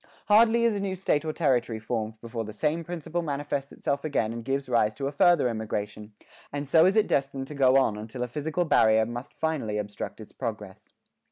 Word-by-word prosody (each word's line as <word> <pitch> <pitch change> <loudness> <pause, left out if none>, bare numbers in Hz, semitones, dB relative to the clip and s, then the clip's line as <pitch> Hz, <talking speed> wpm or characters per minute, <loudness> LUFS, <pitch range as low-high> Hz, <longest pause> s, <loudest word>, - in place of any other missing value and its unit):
Hardly 230 +2 +5
is 230 -1 +3
a 205 - -2
new 195 -1 -2
State 165 -5 0
or 155 - -1
Territory 125 -8 +1
formed 110 -1 -4
before 115 -1 -4
the 110 - -7
same 150 +9 -1
principle 175 0 -4
manifests 145 -2 -3
itself 140 0 -2
again 115 -8 0
and 115 0 -6
gives 135 +2 -2
rise 110 -3 +2
to 140 - -4
a 140 - -1
further 170 0 +4
emigration; 105 -2 -4 0.4
and 145 0 -4
so 160 +4 +6
is 190 - +2
it 215 -1 +4
destined 135 -4 -1
to - - -6
go 135 -2 +4
on 130 -6 +2
until 115 +4 -5
a - - -2
physical 155 +7 -2
barrier 110 -7 +4
must 120 +3 -6
finally 140 -10 -2
obstruct 105 +1 -5
its 110 - -11
progress." 105 -4 -7
135 Hz, 205 wpm, -27 LUFS, 110-160 Hz, 0.4 s, so